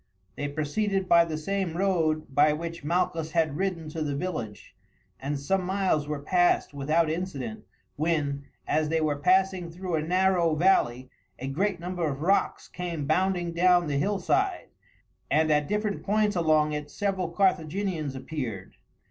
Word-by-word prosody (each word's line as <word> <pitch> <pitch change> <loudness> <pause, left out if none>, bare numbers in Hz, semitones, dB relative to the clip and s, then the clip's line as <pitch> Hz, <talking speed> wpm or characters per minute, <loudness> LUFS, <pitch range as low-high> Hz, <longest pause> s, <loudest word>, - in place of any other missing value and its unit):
They 145 - -3
proceeded 185 +7 -1
by 170 -1 +6
the 160 -2 -4
same 180 +1 -2
road 160 -7 0
by 150 +2 +5
which 165 +1 -5
Malchus 165 -1 -1
had 160 -3 +1
ridden 180 -4 -2
to 160 +1 -5
the 145 -2 -1
village, 120 - -5 0.4
and 140 +1 -3
some 190 +7 0
miles 185 -5 0
were 150 0 -2
passed 175 -2 +2
without 155 +4 +1
incident, 155 -9 -4 0.3
when, 145 -3 -1 0.2
as 155 0 +1
they 165 0 +1
were 150 -2 0
passing 185 +1 +2
through 180 +1 -6
a 155 - +1
narrow 180 -1 +2
valley, 130 -8 +2 0.3
a 130 - -6
great 185 +6 -1
number 175 -1 -2
of 140 0 -4
rocks 195 +4 +1
came 170 -5 -4
bounding 175 +2 +1
down 175 0 +4
the 145 -2 -1
hillside, 340 - 0 0.6
and 155 0 +3
at 150 -1 +2
different 210 0 -1
points 210 0 +1
along 155 -3 +3
it 150 0 -4
several 190 -1 -2
Carthaginians 170 -4 0
appeared. 130 -9 -5
165 Hz, 155 wpm, -27 LUFS, 150-185 Hz, 0.6 s, by